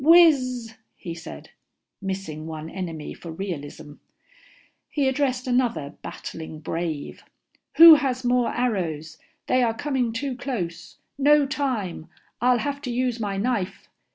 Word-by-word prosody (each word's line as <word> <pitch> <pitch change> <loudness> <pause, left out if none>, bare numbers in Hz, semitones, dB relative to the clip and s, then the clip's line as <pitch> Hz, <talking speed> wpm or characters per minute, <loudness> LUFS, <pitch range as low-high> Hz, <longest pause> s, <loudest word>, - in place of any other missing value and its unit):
Wizzzz," 270 -8 +5 0.2
he 170 - -7
said, 165 0 -10 0.5
missing 190 -5 -4
one 160 0 -6
enemy 165 -5 -5
for 170 - -9
realism. 155 -4 -6 0.9
He 285 -3 +1
addressed 260 -2 0
another 245 - 0
battling 160 -1 -7
brave. 160 -1 -4 0.5
"Who 330 0 +12
has 265 -4 +1
more 245 0 +3
arrows? 165 -10 -2 0.3
They 255 - +2
are 230 -2 +1
coming 260 -3 -1
too 255 +3 -3
close. 185 -10 -5 0.2
No 290 +1 +5
time 235 - -3 0.3
I'll 250 0 +4
have 280 +3 -3
to 250 - -4
use 245 -1 0
my 200 -3 -2
knife." 205 -3 -2
235 Hz, 125 wpm, -24 LUFS, 170-260 Hz, 0.9 s, Who